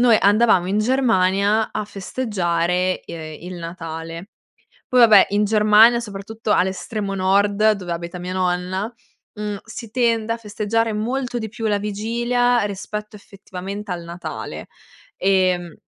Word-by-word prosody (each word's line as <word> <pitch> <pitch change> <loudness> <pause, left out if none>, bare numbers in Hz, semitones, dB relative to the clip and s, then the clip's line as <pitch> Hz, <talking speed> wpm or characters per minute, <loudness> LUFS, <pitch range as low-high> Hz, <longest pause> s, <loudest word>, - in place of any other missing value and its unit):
noi 240 -2 +6
andavamo 205 -3 +4
in 200 +3 0
Germania 215 -3 +2
a 215 - -3
festeggiare, 185 -4 -1
ehm, 155 -2 -8
il 185 - -6
Natale. 165 +1 -7 0.6
Poi, 255 - +2
vabbè, 220 -5 +8
in 205 +1 +2
Germania, 215 +2 +5
soprattutto 215 0 -5
all'estremo 195 +2 -1
nord, 200 +3 +3
dove 185 -4 -4
abita 170 +1 -5
mia 180 +1 -5
nonna, 185 +4 -1 0.4
mhmm, 210 -1 -4
si 225 +1 -9
tende 230 -1 +1
a - - -4
festeggiare 220 +1 -1
molto 245 +4 -2
di 220 - -4
più 225 +1 -6
la 205 -1 +1
vigilia 235 +4 0
rispetto 210 +1 -5
effettivamente 195 0 -8
al 175 -1 -4
Natale 170 +1 -7 0.5
e 185 -1 +3
mhmm 175 -2 -11
205 Hz, 135 wpm, -21 LUFS, 185-220 Hz, 0.6 s, vabbè